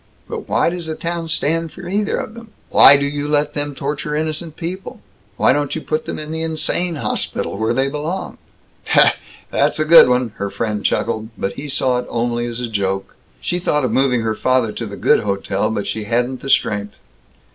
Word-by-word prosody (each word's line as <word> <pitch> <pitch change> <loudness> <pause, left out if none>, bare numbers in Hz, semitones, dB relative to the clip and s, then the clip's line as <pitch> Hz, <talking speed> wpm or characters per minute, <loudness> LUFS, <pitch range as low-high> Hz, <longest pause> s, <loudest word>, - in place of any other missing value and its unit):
"But - - -6
why - - +2
does 175 -2 -5
the 160 - -3
town 170 0 -3
stand 165 0 0
either 200 +4 -1
of 220 - -5
them? 230 -1 -11 0.2
Why 140 - +9
do 140 - -1
you 145 0 -3
let 150 0 +1
them 145 -1 -3
torture 145 +2 -3
innocent 155 +1 -3
people? 180 +3 -6 0.4
Why - - +4
don't 145 0 -1
you 160 - -3
put 155 0 -2
them - - -3
in 155 0 -6
the 160 0 -3
insane 165 +2 -1
hospital, 145 - -2
where 110 +2 0
they 135 +1 +2
belong?" 150 +6 -4 1.1
"That's - - +1
a 155 - +2
good 165 -4 +8
one!" 125 -1 +2
her 100 - -2
friend 105 -1 -3
chuckled. 110 -1 -1
But 100 - -2
he 150 - -7
saw 130 -2 +1
it 125 - -6
only 120 0 -1
as 120 0 -5
a 125 - -2
joke. 95 -3 -2 0.3
She 175 - -1
thought 150 -5 +1
of 125 - -1
moving 125 0 +2
her 110 -1 0
father 130 -1 +1
to 115 +1 -5
the 100 -1 -8
good - - +4
hotel, 100 0 -1
but 105 -2 -2
she 110 -1 -3
hadn't 120 +3 -1
the 135 - -6
strength. 105 -5 +1
140 Hz, 200 wpm, -19 LUFS, 115-160 Hz, 1.1 s, Why